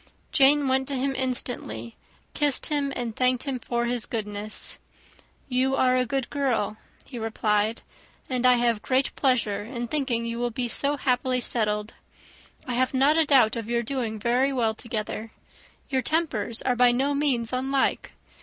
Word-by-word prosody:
Jane 285 Hz, 0 st, +4 dB
went 265 Hz, 0 st, +1 dB
to 280 Hz, -, -2 dB
him 270 Hz, +1 st, -1 dB
instantly, 245 Hz, -, -4 dB, 0.4 s
kissed 290 Hz, -3 st, +1 dB
him, 285 Hz, -2 st, 0 dB
and 235 Hz, -3 st, -4 dB
thanked 255 Hz, -1 st, +1 dB
him 270 Hz, -3 st, -3 dB
for 240 Hz, 0 st, -2 dB
his 240 Hz, -1 st, +2 dB
goodness. 210 Hz, -1 st, -4 dB, 0.7 s
"You 260 Hz, +1 st, +1 dB
are 255 Hz, -1 st, +3 dB
a 255 Hz, -1 st, +1 dB
good 270 Hz, 0 st, -2 dB
girl," 245 Hz, -7 st, -1 dB, 0.3 s
he 245 Hz, -, -8 dB
replied, 220 Hz, 0 st, 0 dB, 0.4 s
"and 255 Hz, -2 st, -2 dB
I 250 Hz, 0 st, +6 dB
have 235 Hz, -3 st, +1 dB
great 260 Hz, +3 st, 0 dB
pleasure 250 Hz, -7 st, +1 dB
in 240 Hz, +2 st, -5 dB
thinking 255 Hz, -5 st, -1 dB
you 230 Hz, 0 st, -4 dB
will 240 Hz, 0 st, 0 dB
be 240 Hz, +1 st, -3 dB
so 285 Hz, +5 st, +1 dB
happily 255 Hz, -1 st, +1 dB
settled. 210 Hz, -3 st, 0 dB, 0.7 s
I 250 Hz, -, -3 dB
have 255 Hz, +2 st, 0 dB
not 275 Hz, +4 st, +4 dB
a 325 Hz, -1 st, +4 dB
doubt 255 Hz, -6 st, +4 dB
of 230 Hz, -1 st, -5 dB
your 235 Hz, 0 st, 0 dB
doing 235 Hz, -3 st, -3 dB
very 245 Hz, +5 st, +1 dB
well 235 Hz, -4 st, +1 dB
together. 220 Hz, 0 st, -5 dB, 0.6 s
Your 260 Hz, -1 st, +1 dB
tempers 250 Hz, -7 st, +1 dB
are 250 Hz, -, +1 dB
by 245 Hz, 0 st, +5 dB
no 270 Hz, +4 st, +1 dB
means 260 Hz, -5 st, 0 dB
unlike. 265 Hz, +2 st, 0 dB
250 Hz, 165 wpm, -25 LUFS, 230-270 Hz, 0.7 s, I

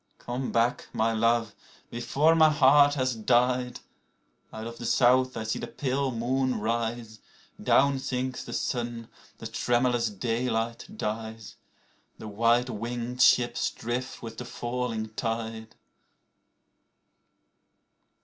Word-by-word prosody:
Come 125 Hz, +2 st, -4 dB
back! 115 Hz, +1 st, +1 dB
my 110 Hz, +1 st, +1 dB
love, 115 Hz, -1 st, +1 dB, 0.4 s
before 140 Hz, +7 st, +2 dB
my 160 Hz, -1 st, +6 dB
heart 145 Hz, 0 st, +5 dB
has 130 Hz, -2 st, 0 dB
died. 125 Hz, +2 st, +1 dB, 0.7 s
(Out 110 Hz, 0 st, -7 dB
of 115 Hz, 0 st, -8 dB
the 120 Hz, -, -6 dB
South 130 Hz, 0 st, +3 dB
I 110 Hz, -, -3 dB
see 110 Hz, -, -2 dB
the -, -, -5 dB
pale 135 Hz, 0 st, -1 dB
moon 130 Hz, +1 st, -1 dB
rise.) 115 Hz, 0 st, -3 dB, 0.4 s
Down 140 Hz, -1 st, +3 dB
sinks 130 Hz, -1 st, -3 dB
the -, -, -9 dB
sun, 120 Hz, -2 st, -3 dB, 0.3 s
the -, -, -10 dB
tremulous 120 Hz, -1 st, +1 dB
daylight 115 Hz, +2 st, -2 dB
dies, 110 Hz, -, -5 dB, 0.6 s
The -, -, -9 dB
white 115 Hz, +4 st, +2 dB
winged 120 Hz, +3 st, -4 dB
ships 120 Hz, -2 st, +4 dB
drift 120 Hz, +2 st, -5 dB
with 115 Hz, -1 st, -7 dB
the 125 Hz, -, -6 dB
falling 120 Hz, -2 st, -3 dB
tide. 110 Hz, 0 st, -4 dB
120 Hz, 120 wpm, -27 LUFS, 115-125 Hz, 0.7 s, my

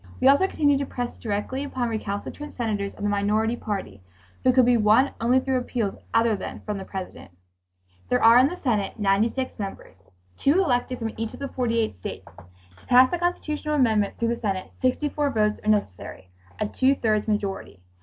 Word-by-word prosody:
We -, -, +3 dB
also 280 Hz, +8 st, +5 dB
continued 285 Hz, -6 st, +2 dB
to 280 Hz, -, -3 dB
press 245 Hz, -1 st, -4 dB
directly 225 Hz, +5 st, -3 dB
upon 260 Hz, -4 st, -2 dB
recalcitrant 220 Hz, +7 st, -5 dB
senators 210 Hz, -4 st, -2 dB
of -, -, -9 dB
the 205 Hz, -, +1 dB
minority 210 Hz, +3 st, +1 dB
party 200 Hz, -, -5 dB, 0.4 s
who 255 Hz, -, +5 dB
could 255 Hz, -1 st, +5 dB
be 245 Hz, 0 st, +4 dB
won 225 Hz, +5 st, +4 dB
only 245 Hz, +3 st, +4 dB
through 260 Hz, 0 st, 0 dB
appeals 235 Hz, -5 st, -2 dB, 0.2 s
other 225 Hz, -1 st, +3 dB
than -, -, -7 dB
from 210 Hz, -2 st, -4 dB
the 190 Hz, -, -7 dB
President. 190 Hz, -1 st, -7 dB, 0.8 s
There 125 Hz, -, +1 dB
are 230 Hz, +2 st, +8 dB
in 260 Hz, -, +5 dB
the 355 Hz, -, -4 dB
Senate 220 Hz, -, -1 dB
96 220 Hz, +6 st, 0 dB
members—2 90 Hz, -, -4 dB
elected 255 Hz, -8 st, +1 dB
from 225 Hz, -2 st, -4 dB
each 225 Hz, 0 st, -4 dB
of -, -, -13 dB
the 280 Hz, -1 st, -4 dB
48 230 Hz, -, -1 dB
states. -, -, -8 dB, 0.5 s
To -, -, -22 dB
pass 255 Hz, +3 st, +6 dB
a 350 Hz, -, 0 dB
constitutional 305 Hz, -3 st, -2 dB
amendment 220 Hz, -7 st, +2 dB
through 230 Hz, -, 0 dB
the 235 Hz, -, -1 dB
Senate, 195 Hz, -5 st, -3 dB
64 290 Hz, +3 st, 0 dB
votes 215 Hz, -4 st, +1 dB
are 215 Hz, -, -1 dB
necessary, 95 Hz, -, -2 dB, 0.3 s
a 215 Hz, -, 0 dB
two 265 Hz, +5 st, +2 dB
thirds 215 Hz, -4 st, 0 dB
majority. 200 Hz, -, -3 dB
230 Hz, 185 wpm, -24 LUFS, 205-260 Hz, 0.8 s, are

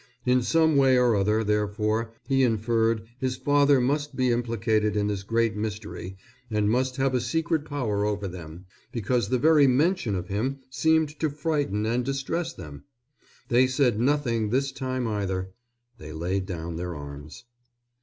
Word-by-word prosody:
In 125 Hz, 0 st, +3 dB
some 160 Hz, +3 st, +3 dB
way 135 Hz, -2 st, +5 dB
or 125 Hz, -3 st, +4 dB
other, 105 Hz, +3 st, +1 dB
therefore, 105 Hz, +2 st, 0 dB, 0.2 s
he 135 Hz, -1 st, +2 dB
inferred, 115 Hz, -1 st, +1 dB, 0.2 s
his 130 Hz, -1 st, -1 dB
father 145 Hz, 0 st, +3 dB
must 145 Hz, +3 st, -1 dB
be 130 Hz, -1 st, +2 dB
implicated 110 Hz, -3 st, 0 dB
in 105 Hz, -, +1 dB
this 105 Hz, -2 st, -2 dB
great 115 Hz, +1 st, 0 dB
mystery 105 Hz, -3 st, -5 dB, 0.3 s
and 105 Hz, -1 st, +1 dB
must 130 Hz, +2 st, 0 dB
have 135 Hz, 0 st, 0 dB
a 125 Hz, -, +1 dB
secret 160 Hz, +4 st, -1 dB
power 115 Hz, -9 st, -2 dB
over 105 Hz, -1 st, -1 dB
them, 85 Hz, -1 st, -9 dB, 0.3 s
because 120 Hz, -1 st, -1 dB
the 130 Hz, -, +2 dB
very 150 Hz, +1 st, +5 dB
mention 135 Hz, -, +2 dB
of 90 Hz, 0 st, -4 dB
him 115 Hz, +8 st, -2 dB
seemed 160 Hz, +4 st, +2 dB
to 155 Hz, -, +1 dB
frighten 145 Hz, -8 st, -1 dB
and 120 Hz, +3 st, 0 dB
distress 135 Hz, +6 st, -2 dB
them. 75 Hz, -5 st, -10 dB, 0.7 s
They 125 Hz, +1 st, +4 dB
said 130 Hz, -4 st, +1 dB
nothing 120 Hz, -5 st, +1 dB
this 135 Hz, +4 st, 0 dB
time 130 Hz, -2 st, -3 dB
either. 95 Hz, -3 st, -2 dB, 0.5 s
They 75 Hz, 0 st, -9 dB
laid 90 Hz, +4 st, -2 dB
down 85 Hz, -3 st, -5 dB
their 90 Hz, 0 st, -4 dB
arms. 70 Hz, +3 st, -9 dB
115 Hz, 160 wpm, -26 LUFS, 105-135 Hz, 0.7 s, way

